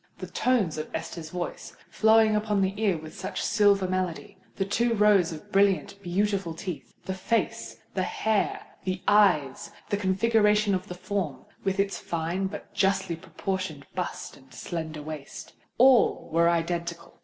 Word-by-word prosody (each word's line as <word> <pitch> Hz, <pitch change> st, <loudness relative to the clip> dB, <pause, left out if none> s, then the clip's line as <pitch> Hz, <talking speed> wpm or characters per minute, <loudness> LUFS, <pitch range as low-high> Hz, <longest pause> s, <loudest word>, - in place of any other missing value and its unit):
The -, -, -6 dB
tones 220 Hz, -12 st, +1 dB
of 155 Hz, -, -5 dB
Esther's 160 Hz, -2 st, -5 dB
voice, 175 Hz, +1 st, -6 dB
flowing 220 Hz, 0 st, +5 dB
upon 210 Hz, -1 st, +1 dB
the 190 Hz, 0 st, +1 dB
ear 200 Hz, -6 st, +2 dB
with 155 Hz, +1 st, -10 dB
such -, -, -5 dB
silver 205 Hz, -3 st, +3 dB
melody,—the 185 Hz, +1 st, -3 dB
two 235 Hz, +4 st, +1 dB
rows 205 Hz, -5 st, +4 dB
of 155 Hz, -2 st, -10 dB
brilliant, 200 Hz, 0 st, +2 dB
beautiful 195 Hz, -1 st, -1 dB
teeth,—the 180 Hz, +2 st, -6 dB
face—the 225 Hz, +5 st, -2 dB
hair—the 215 Hz, -, -2 dB
eyes,—the 195 Hz, -2 st, +2 dB
configuration 210 Hz, +1 st, +3 dB
of 185 Hz, +1 st, -2 dB
the 180 Hz, -, -6 dB
form, 180 Hz, -8 st, -3 dB, 0.2 s
with 195 Hz, 0 st, -1 dB
its 195 Hz, 0 st, 0 dB
fine 170 Hz, +3 st, -2 dB
but 205 Hz, +1 st, -9 dB
justly 195 Hz, -3 st, +1 dB
proportioned 185 Hz, -3 st, -4 dB
bust 180 Hz, 0 st, -4 dB
and 130 Hz, -1 st, -20 dB
slender 160 Hz, +1 st, -5 dB
waist,—all 155 Hz, -, +1 dB
were 170 Hz, +1 st, +4 dB
identical! 170 Hz, 0 st, -2 dB
190 Hz, 130 wpm, -27 LUFS, 170-205 Hz, 0.2 s, flowing